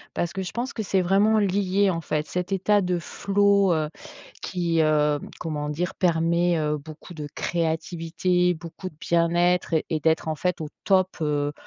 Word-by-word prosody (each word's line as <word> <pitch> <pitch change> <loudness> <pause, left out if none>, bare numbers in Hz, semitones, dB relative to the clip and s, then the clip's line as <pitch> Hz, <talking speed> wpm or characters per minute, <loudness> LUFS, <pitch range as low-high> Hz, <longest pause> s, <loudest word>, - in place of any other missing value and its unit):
Parce 170 0 -1
que 190 - -3
je 185 - -5
pense 240 +4 -3
que 225 - -3
c'est 195 -2 +1
vraiment 200 +4 +3
lié, 200 0 +2
en 165 -2 -3
fait, 150 -1 -2
cet 180 +2 -4
état 200 +2 +2
de 180 -1 0
flow, 200 +2 +2
heu, 155 -1 -1 0.5
qui, 170 -3 0
heu, 150 -1 +2 0.2
comment 150 -3 -3
dire? 170 +5 -2
Permet, 170 0 +2
heu, 150 -1 0
beaucoup 155 +4 -11
de 150 -3 -6
créativité, 170 +2 0
beaucoup 170 +3 -8
de 155 - -23
bien-être, 170 +1 +2 0.2
et 160 - +1
d'être 160 +1 +1
en 155 - -1
fait 180 +3 -1
au 155 - -5 0.2
top, 190 -1 +2
heu, 145 -1 0
175 Hz, 175 wpm, -25 LUFS, 160-190 Hz, 0.5 s, vraiment